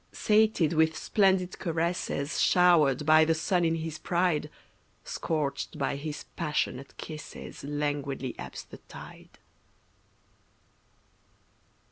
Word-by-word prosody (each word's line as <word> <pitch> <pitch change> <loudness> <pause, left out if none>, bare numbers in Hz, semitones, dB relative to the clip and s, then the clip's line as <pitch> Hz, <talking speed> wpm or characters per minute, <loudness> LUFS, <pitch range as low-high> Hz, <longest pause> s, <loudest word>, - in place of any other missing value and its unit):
Sated 215 -6 +2
with 160 0 +2
splendid 190 -3 +1
caresses 165 -3 -1
Showered 155 -6 +4
by 155 +1 +7
the 165 +1 +2
sun 175 +2 +1
in 165 0 +2
his 160 -1 -5
pride, 170 -4 0 0.5
Scorched 150 -1 -3
by 140 -1 -1
his 150 +1 -5
passionate 150 -4 -2
kisses 155 -1 -9
Languidly 145 -3 -2
ebbs - - -7
the - - -12
tide. - - -12
160 Hz, 100 wpm, -28 LUFS, 145-175 Hz, 0.5 s, by